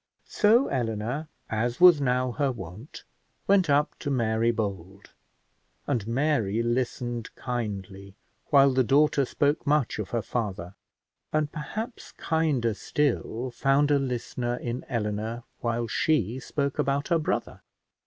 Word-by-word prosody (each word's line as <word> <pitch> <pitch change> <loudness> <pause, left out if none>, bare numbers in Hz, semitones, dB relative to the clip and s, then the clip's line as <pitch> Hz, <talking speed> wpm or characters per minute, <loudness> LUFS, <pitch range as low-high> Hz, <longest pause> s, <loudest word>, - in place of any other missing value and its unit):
So 230 +5 +4
Eleanor, 120 +4 -2 0.2
as 120 +3 -1
was 175 -5 +8
now 125 -1 +1
her 140 +2 0
wont, 105 - -9 0.4
went 195 -4 +3
up 145 +1 +3
to 145 - -4
Mary 115 -3 +1
Bold, 100 -4 -4 0.7
and 120 -7 -1
Mary 115 -4 +1
listened 120 -1 -2
kindly, 100 -5 -5 0.3
while 140 -1 +6
the 130 0 +3
daughter 140 +3 +3
spoke 145 +3 0
much 145 -6 +1
of 105 - -4
her 115 -2 -1
father, 95 -6 -3 0.6
and, 155 -1 0
perhaps 220 - -6
kinder 150 -8 0
still, 125 -1 -1
found 135 +4 +2
a 145 - +4
listener 125 -2 -2
in 120 +1 -4
Eleanor, 110 0 -2 0.2
while 115 0 -1
she 120 - 0
spoke 140 +1 -3
about 140 +2 0
her 170 -2 +3
brother. 155 - -2
125 Hz, 130 wpm, -27 LUFS, 115-145 Hz, 0.7 s, was